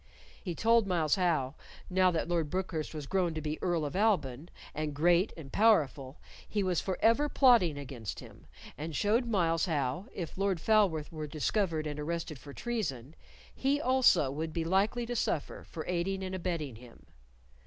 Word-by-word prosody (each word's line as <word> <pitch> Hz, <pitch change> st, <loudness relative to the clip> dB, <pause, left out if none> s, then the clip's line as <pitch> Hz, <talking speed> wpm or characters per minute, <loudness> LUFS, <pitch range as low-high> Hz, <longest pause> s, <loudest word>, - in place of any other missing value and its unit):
He 175 Hz, -4 st, -4 dB
told 230 Hz, 0 st, +3 dB
Myles 165 Hz, -5 st, +1 dB
how, 160 Hz, -8 st, +1 dB, 0.3 s
now 185 Hz, 0 st, +3 dB
that 165 Hz, -3 st, -1 dB
Lord 170 Hz, -3 st, 0 dB
Brookhurst 180 Hz, -4 st, -3 dB
was 150 Hz, -3 st, -6 dB
grown 180 Hz, 0 st, 0 dB
to -, -, -2 dB
be 155 Hz, +1 st, -4 dB
Earl 175 Hz, -4 st, 0 dB
of 145 Hz, -, -5 dB
Alban, 175 Hz, -, +1 dB, 0.2 s
and 150 Hz, -1 st, -3 dB
great 175 Hz, +6 st, +3 dB
and 140 Hz, -5 st, -10 dB
powerful, 150 Hz, -11 st, +2 dB, 0.3 s
he 205 Hz, -2 st, 0 dB
was 180 Hz, -3 st, +1 dB
forever 230 Hz, +9 st, +2 dB
plotting 235 Hz, -, +4 dB
against 130 Hz, -7 st, -6 dB
him, -, -, -14 dB, 0.3 s
and 155 Hz, +1 st, -5 dB
showed 225 Hz, -, +2 dB
Myles 170 Hz, -5 st, +1 dB
how, 145 Hz, -, -1 dB
if 175 Hz, +1 st, -6 dB
Lord 195 Hz, -3 st, +1 dB
Falworth 190 Hz, -7 st, +2 dB
were 155 Hz, -2 st, -5 dB
discovered 160 Hz, +1 st, -1 dB
and 150 Hz, -1 st, -4 dB
arrested 165 Hz, -1 st, -4 dB
for 140 Hz, +3 st, -11 dB
treason, 155 Hz, -, -4 dB, 0.4 s
he 275 Hz, +2 st, +1 dB
also 255 Hz, -, +4 dB
would 155 Hz, +3 st, -4 dB
be 165 Hz, -, -1 dB
likely 200 Hz, +7 st, +1 dB
to 245 Hz, +1 st, -4 dB
suffer 155 Hz, -9 st, -2 dB
for 160 Hz, -, -6 dB
aiding 185 Hz, +2 st, -1 dB
and 185 Hz, 0 st, -4 dB
abetting 170 Hz, -9 st, -3 dB
him. 120 Hz, 0 st, -16 dB
170 Hz, 170 wpm, -31 LUFS, 150-195 Hz, 0.4 s, plotting